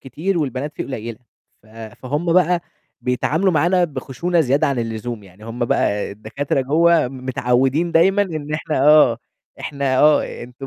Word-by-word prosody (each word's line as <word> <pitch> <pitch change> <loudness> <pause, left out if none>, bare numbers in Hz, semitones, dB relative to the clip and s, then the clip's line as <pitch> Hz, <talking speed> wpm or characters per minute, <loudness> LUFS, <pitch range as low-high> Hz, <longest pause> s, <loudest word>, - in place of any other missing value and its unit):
كتير 170 +8 -3
والبنات 145 0 -3
فيه - - -3
قليّلة، 115 -3 -6 0.4
ف - - -24
فهُم 125 +9 -4
بقى 180 -1 +3 0.4
بيتعاملوا 160 +9 0
معانا 175 +4 +2
بخشونة 170 +3 -2
زيادة 140 -1 +2
عن 135 -3 -1
اللزوم، 115 0 -4
يعني 95 +2 -16
هم 120 +1 -3
بقى 105 -3 0
الدكاترة 115 +7 -3
جوّه 160 +2 +3
متعوِّدين 130 +4 0
دايمًا 190 +5 +4
إن 155 -5 -5
إحنا 155 -2 -2
آه 150 -6 +6 0.4
إحنا 140 -2 -1
آه 150 +2 +2
أنتم 125 +3 -10
140 Hz, 145 wpm, -20 LUFS, 120-165 Hz, 0.4 s, آه